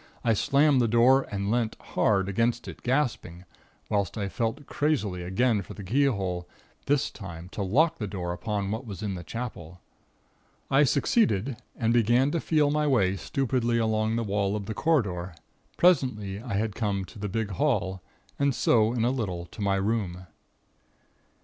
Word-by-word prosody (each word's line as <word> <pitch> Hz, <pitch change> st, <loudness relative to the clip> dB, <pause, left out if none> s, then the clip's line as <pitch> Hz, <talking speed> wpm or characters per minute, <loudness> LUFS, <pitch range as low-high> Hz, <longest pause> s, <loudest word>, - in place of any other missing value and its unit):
I 115 Hz, -, +3 dB
slammed 140 Hz, +4 st, +3 dB
the 120 Hz, -, +3 dB
door 125 Hz, +4 st, +4 dB
and 100 Hz, 0 st, -2 dB
leant 115 Hz, -2 st, 0 dB
hard 95 Hz, -2 st, +1 dB
against 115 Hz, +4 st, 0 dB
it, -, -, -9 dB
gasping, 120 Hz, -, -1 dB, 0.4 s
whilst 100 Hz, 0 st, -1 dB
I 100 Hz, -2 st, -2 dB
felt 115 Hz, +6 st, -2 dB
crazily 125 Hz, -14 st, -1 dB
again 105 Hz, +5 st, +1 dB
for 90 Hz, -, -10 dB
the 100 Hz, -, -8 dB
keyhole, 95 Hz, -7 st, 0 dB, 0.4 s
this 145 Hz, -1 st, +1 dB
time 90 Hz, -3 st, -9 dB
to 100 Hz, -, -5 dB
lock 135 Hz, -, +2 dB
the 105 Hz, -, -2 dB
door 90 Hz, -3 st, -4 dB
upon 100 Hz, +1 st, -3 dB
what 110 Hz, +4 st, -3 dB
was 100 Hz, 0 st, -7 dB
in 100 Hz, -2 st, -2 dB
the 90 Hz, -2 st, -6 dB
Chapel. 90 Hz, -6 st, -7 dB, 0.9 s
I 140 Hz, +2 st, +5 dB
succeeded, 135 Hz, -, +2 dB, 0.2 s
and 115 Hz, -1 st, +1 dB
began 120 Hz, +4 st, +3 dB
to 170 Hz, -, 0 dB
feel 150 Hz, -2 st, +2 dB
my 150 Hz, 0 st, +1 dB
way 100 Hz, -9 st, +3 dB
stupidly 120 Hz, +1 st, 0 dB
along 110 Hz, -1 st, +1 dB
the 115 Hz, -, 0 dB
wall 100 Hz, -1 st, 0 dB
of 105 Hz, -2 st, -4 dB
the 110 Hz, -, -4 dB
corridor. 95 Hz, -, 0 dB, 0.4 s
Presently 115 Hz, -, +2 dB
I 115 Hz, -4 st, -4 dB
had 105 Hz, +1 st, -1 dB
come 100 Hz, -3 st, -1 dB
to 105 Hz, -, -13 dB
the 105 Hz, 0 st, -3 dB
big 105 Hz, +1 st, -2 dB
hall, 95 Hz, -6 st, 0 dB, 0.4 s
and 140 Hz, -2 st, +2 dB
so 110 Hz, 0 st, +3 dB
in 115 Hz, -2 st, 0 dB
a 125 Hz, -, +2 dB
little 95 Hz, -9 st, -3 dB
to 90 Hz, -, -11 dB
my 100 Hz, -1 st, +2 dB
room. 95 Hz, -3 st, -1 dB
110 Hz, 170 wpm, -27 LUFS, 95-130 Hz, 0.9 s, I